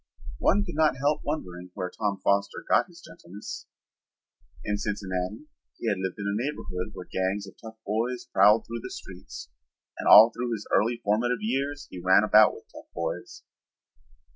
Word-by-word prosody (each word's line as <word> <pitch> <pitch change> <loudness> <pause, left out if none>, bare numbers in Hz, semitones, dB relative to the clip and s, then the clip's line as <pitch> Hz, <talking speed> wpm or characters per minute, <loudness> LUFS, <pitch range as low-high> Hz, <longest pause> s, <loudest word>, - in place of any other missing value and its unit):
One 105 - +3
could - - -6
not 155 -3 +2
help 145 +3 +1
wondering 90 - -5
where 90 -2 -4
Tom 100 -1 -2
Foster 100 0 0
got - - +3
his - - -16
gentleness. 95 +5 -9 1.0
In 105 -1 -1
Cincinnati 95 - -3 0.3
he 115 - -2
had 100 - -1
lived 95 -1 -3
in 100 - -5
a 100 +3 -1
neighborhood 90 -10 -5
where 90 - -8
gangs 95 +3 -2
of 95 - -12
tough 110 -1 -10
boys 115 +4 -2
prowled 105 +3 +4
through 115 +1 -5
the - - -7
streets, 95 -1 -10 0.5
and - - -3
all 110 +2 +10
through 120 0 -3
his 105 -2 -5
early 115 +3 +3
formative 120 +4 +1
years 140 +5 -2
he 90 - -7
ran 95 +2 +5
about 105 0 +6
with - - -12
tough - - -13
boys. 85 -1 -5
105 Hz, 170 wpm, -27 LUFS, 95-120 Hz, 1.0 s, all